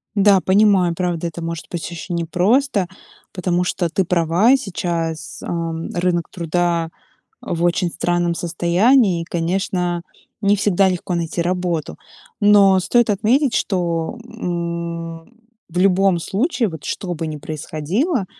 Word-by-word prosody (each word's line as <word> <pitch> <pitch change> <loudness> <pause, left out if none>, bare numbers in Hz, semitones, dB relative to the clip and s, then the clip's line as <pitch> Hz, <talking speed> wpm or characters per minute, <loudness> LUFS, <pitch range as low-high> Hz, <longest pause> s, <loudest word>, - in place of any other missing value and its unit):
Да, 200 -2 +5
понимаю, 190 -3 +4
правда, 175 -1 -2
это 170 +1 -7
может 165 -1 -5
быть 170 -2 -4
очень 170 +1 -5
непросто, 190 - +1 0.5
потому 180 -1 0
что 180 -1 -1
ты 190 +4 +1
права 180 +8 +3
сейчас. 170 - -4
Ам, 165 -1 -3
рынок 175 -1 0
труда 170 -1 -1 0.5
в 170 0 -2
очень 175 0 +1
странном 175 0 0
состоянии, 175 +4 +2
и, - - -6
конечно, 175 0 -1 0.4
не 200 -1 +3
всегда 195 -1 +3
легко 180 0 -2
найти 170 0 -2
работу. 175 - -2 0.4
Но 200 -2 +6
стоит 235 +5 +2
отметить, 235 +6 +2
что, 170 0 -1
м, 170 -6 -4 0.4
в 175 +1 -4
любом 190 -1 +3
случае, 235 - 0
вот 160 -4 -9
что 180 -3 -3
бы 165 0 -4
ни 155 -1 -4
происходило, 170 - -2
175 Hz, 130 wpm, -20 LUFS, 170-195 Hz, 0.5 s, Но